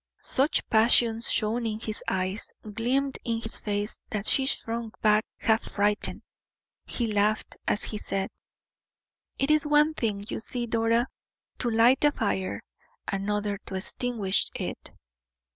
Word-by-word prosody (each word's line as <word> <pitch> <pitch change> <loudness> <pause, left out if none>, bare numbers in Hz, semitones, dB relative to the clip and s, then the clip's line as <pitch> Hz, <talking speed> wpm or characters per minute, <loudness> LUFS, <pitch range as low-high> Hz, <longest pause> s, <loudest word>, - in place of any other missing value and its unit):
Such 275 +4 +1
passion 225 0 +5
shone 230 +1 +1
in 215 -1 -3
his 220 -1 -4
eyes, 190 +3 -2
gleamed 245 +6 -1
in 230 -1 -1
his 225 -1 -3
face, 205 0 -3
that 210 -1 -3
she 265 +3 +3
shrunk 230 -3 -2
back 215 0 +4
half 220 0 +2
frightened. 205 0 0 0.6
He 240 - 0
laughed, 210 +1 +1
as - - +2
he 210 - -3
said: 195 -1 -2 1.1
"It 275 +2 +1
is 305 -1 +3
one 295 +1 +4
thing, 210 -7 -2
you - - -4
see, 240 +2 -3
Dora, 230 +1 +1 0.5
to 245 - +1
light 235 +4 +4
a 295 - +5
fire, 100 - -2 0.4
another 205 +1 -1
to 190 - -4
extinguish 200 0 +1
it." - - -5
225 Hz, 140 wpm, -27 LUFS, 205-240 Hz, 1.1 s, passion